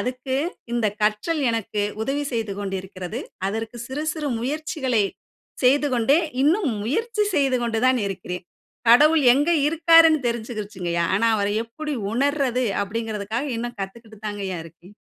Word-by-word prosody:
அதுக்கு 255 +1 -2 0.4
இந்த 235 -2 +1 0.2
கற்றல் 215 +10 +1
எனக்கு 215 -2 -2 0.2
உதவி 280 +5 -1
செய்து 225 -3 -2
கொண்டு 195 -1 -3
இருக்கிறது. 185 +3 -7 0.3
அதற்கு 225 +3 -4
சிறு 285 +4 -4
சிறு 305 -3 -3
முயற்சிகளை 265 -4 0 0.6
செய்துகொண்டே 275 +1 +4 0.2
இன்னும் 315 - +3
முயற்சி 425 - 0
செய்துகொண்டு 250 -5 +1
தான் 255 -1 +3
இருக்கிறேன். 180 -2 -5 0.5
கடவுள் 300 +5 +6
எங்க 290 +5 +2 0.2
இருக்காருன்னு 325 -1 +6
தெரிஞ்சுக்கிருச்சுங்கய்யா. 210 -7 -3
ஆனா 230 +3 +3
அவர 200 0 0 0.2
எப்படி 300 +6 -5 0.2
உணர்றது 265 -1 +1 0.2
அப்படிங்குறதுக்காக 220 +3 -3
இன்னும் 240 +1 -4
காத்துக்கிட்டுக்கு 215 +2 -8
தாங்கய்யா 195 -3 -4
தான் 160 - -7
இருக்கேன. 175 +4 -17
235 Hz, 125 wpm, -23 LUFS, 210-285 Hz, 0.6 s, கடவுள்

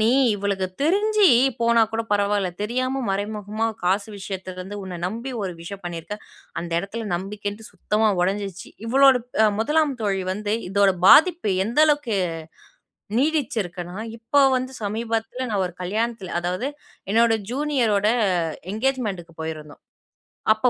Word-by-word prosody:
"நீ 220 - +4 0.3
இவளுக்கு 200 -2 -1 0.2
தெரிஞ்சி 410 +4 +4 0.3
போனா 235 0 +4
கூட 225 - -1
பரவால்ல, 205 -2 +1
தெரியாம 255 +4 -1
மறைமுகமா 210 +2 -2 0.2
காசு 200 +4 +1
விஷயத்துலருந்து 190 0 -6
உன்னை 185 -2 -6
நம்பி 230 +7 -5
ஒரு 185 - -3
விஷயம் 195 +2 -8
பண்ணியிருக்க. 175 +4 -5 0.4
அந்த 170 0 -6
இடத்தில 215 +4 -5
நம்பிக்கைன்ட்டு 205 +3 -6
சுத்தமா 210 +3 +1
உடைஞ்சிருச்சி". 195 0 -2 0.2
இவளோட 270 +2 +6 0.3
அ - - +6
முதலாம் 300 +3 +2
தோழி 195 -2 0
வந்து, 210 +2 -2
இதோட 200 0 +4 0.2
பாதிப்பு 335 - +6 0.2
எந்தளவுக்கு, 290 -3 +2 1.0
நீடிச்சிருக்குன்னா, 215 - -1 0.2
இப்போ 280 +5 +2 0.2
வந்து 255 +1 -3
சமீபத்துல 225 +4 -2
நான் 200 -3 +1
ஒரு 180 - -7
கல்யாணத்துல 215 0 -2
அதாவது 180 +8 -2 0.4
என்னோட 230 +1 +4 0.2
ஜூனியரோட, 245 -7 +1 0.6
எங்கேஜ்மெண்ட்டுக்கு 215 -8 -2
போயிருந்தோம். 155 -2 -6 0.7
அப்போ 245 +3 +2
210 Hz, 120 wpm, -23 LUFS, 195-250 Hz, 1.0 s, இவளோட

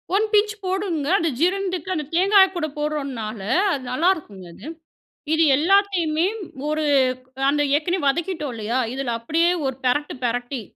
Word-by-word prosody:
1 430 +2 +3
pinch 420 0 +3
போடணுங்க. 365 -6 -2
அது 330 -1 0
ஜீரணத்துக்கு 370 0 0
அந்த 300 -2 -3
தேங்காய் 385 +1 +5
கூட 315 -3 -1
போட்றோனால 270 -8 -3 0.3
அது 270 -2 -4
நல்லாயிருக்குங்க 275 - -1
அது. - - -13 0.7
இது 325 +1 +3
எல்லாத்தையுமே 350 -2 +2 0.4
ஒரு 310 0 -1 0.7
அந்த 290 +1 +1
ஏற்கனவே 335 0 -1
வதக்கிட்டோம் 305 -3 -1
இல்லையா? 225 +4 -2
இதில 260 -3 -3
அப்படியே 330 +9 +1
ஒரு 265 -1 -2
பெரட்டு, 290 +4 0
பெரட்டி 245 +1 -2
310 Hz, 135 wpm, -22 LUFS, 270-370 Hz, 0.7 s, தேங்காய்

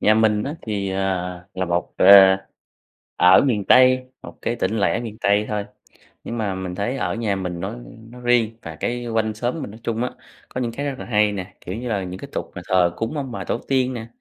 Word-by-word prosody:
Nhà 110 - +4
mình 110 -1 +3
á, 145 - -4
thì, 100 -3 -3
ờ, 95 +1 -2 0.5
là 95 - -1
một, 85 0 -2
ờ - - +3 1.1
ở 90 +1 +7
miền 115 -8 +1
Tây, 130 +2 +5 0.2
một - - -11
cái 120 - -1
tỉnh 110 - -1
lẻ 100 - +1
miền 110 -3 -7
Tây 100 +1 +3
thôi, 105 -1 -2 0.6
nhưng 120 - -5
mà 100 -4 -1
mình 95 -1 -5
thấy 110 +8 -2
ở - - -1
nhà 110 -4 -1
mình 90 -2 -4
nói 95 +5 -4 0.3
nói 125 +1 -12
riêng, 120 -2 +2
và 80 -1 -8
cái 120 +8 -3
quanh 110 -1 0
xóm 120 +8 -3
mình 115 - -6
nói 110 - -12
chung 115 +1 -1
á, 125 - -2 0.4
có 125 - -4
những 120 -2 -1
cái 140 +5 -4
rất 140 -2 -2
là - - -6
hay 105 -2 +2
nè. 95 -1 -6
Kiểu 90 - -6
như 120 +3 -5
là, 100 -4 -1
những 90 0 -7
cái - - -9
tục - - -4
mà - - -6
thờ 90 -2 +3
cúng 115 +7 -3
ông 135 -3 -4
bà - - -5
tổ - - -1
tiên 130 -1 +1
nè, 115 -2 -6
110 Hz, 240 wpm, -22 LUFS, 100-120 Hz, 1.1 s, ở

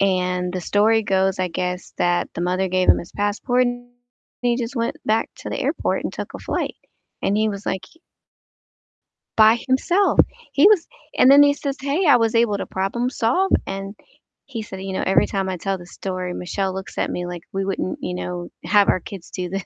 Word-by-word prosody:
And 180 -2 +1
the 185 - -3
story 220 +4 +3
goes, 190 -1 +1
I 185 -1 0
guess, 180 +1 -4
that 175 0 +1
the - - -4
mother 185 +2 0
gave 185 0 +1
him - - +7
his 170 - -9
passport 210 +5 +1
and 245 0 -4 0.5
he 240 -1 +1
just 240 +1 -4
went 230 0 -1
back 220 +1 +1
to - - -7
the - - -3
airport - - -1
and - - -3
took - - -6
a - - -5
flight, - - -3 0.5
and 200 - +1
he 220 +1 +2
was 200 -1 -5
like 190 -1 -1 1.6
by 220 +1 +7
himself. 350 +10 +2 0.3
He 280 +5 +5
was 405 -6 +4 0.3
and 255 - +6
then 285 +1 +9
he 285 0 +5
says, 280 -1 -3
"Hey, 285 +7 0
I 285 -5 +7
was 225 0 +1
able 230 -3 +3
to - - -4
problem 200 +6 -1
solve," 255 +11 +1 0.2
and 195 +1 -5 0.5
he 245 -5 -6
said, 190 -3 -8
"You 195 0 -5
know, - - -1
every 190 - +3
time 195 -1 -2
I 185 - -3
tell 195 +2 -2
the 175 - -12
story, 185 0 -5
Michelle 190 +2 -2
looks 190 0 -7
at - - 0
me 175 - -3
like 175 -1 -6
we 195 0 -2
wouldn't, 190 -1 -2
you - - -3
know, 180 -1 -5
have 200 +3 +4
our - - +3
kids 190 -2 -9
do 180 -1 -4
this." 195 +1 -3
195 Hz, 210 wpm, -22 LUFS, 185-235 Hz, 1.6 s, then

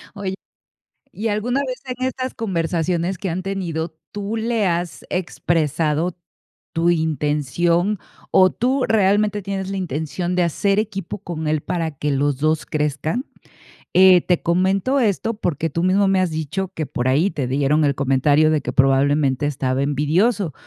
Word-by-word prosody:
Oye, 195 -2 -3 0.8
¿y 220 +3 -3
alguna 235 +6 0
vez 255 - -5
en 255 0 -3
estas 260 0 -4
conversaciones 175 -2 -1
que 190 0 -3
han 185 +3 -3
tenido, 170 -4 -3 0.2
tú 205 +2 -4
le 225 -1 0
has 170 -6 -2
expresado 165 -1 0 0.6
tu 165 +1 +2
intención 160 +4 +1 0.3
o 185 0 +6
tú 255 +3 0
realmente 210 0 +2
tienes 195 0 -4
la 195 - -3
intención 175 +1 -3
de 180 - +3
hacer 195 +5 +1
equipo 200 -4 -4
con 165 -5 -5
él 155 -1 +1
para 165 -2 -2
que 145 +1 -2
los 140 0 +1
2 155 +1 0
crezcan? 155 - -2 0.7
Eh, 185 -1 +7
te 180 0 +1
comento 190 +10 +1
esto 220 0 0
porque 165 -5 -2
tú 165 +3 -2
mismo 195 +2 +3
me 190 -1 +3
has 185 -3 +1
dicho 160 +5 -3
que 155 - -2
por 125 -1 -2
ahí 150 +9 +2
te 140 -5 -3
dieron 145 +3 +2
el 140 - +1
comentario 145 +3 +3
de 155 -2 +1
que 125 -1 -4
probablemente 135 0 +3
estaba 135 -2 -1
envidioso. 160 - +1
170 Hz, 155 wpm, -21 LUFS, 150-195 Hz, 0.8 s, Eh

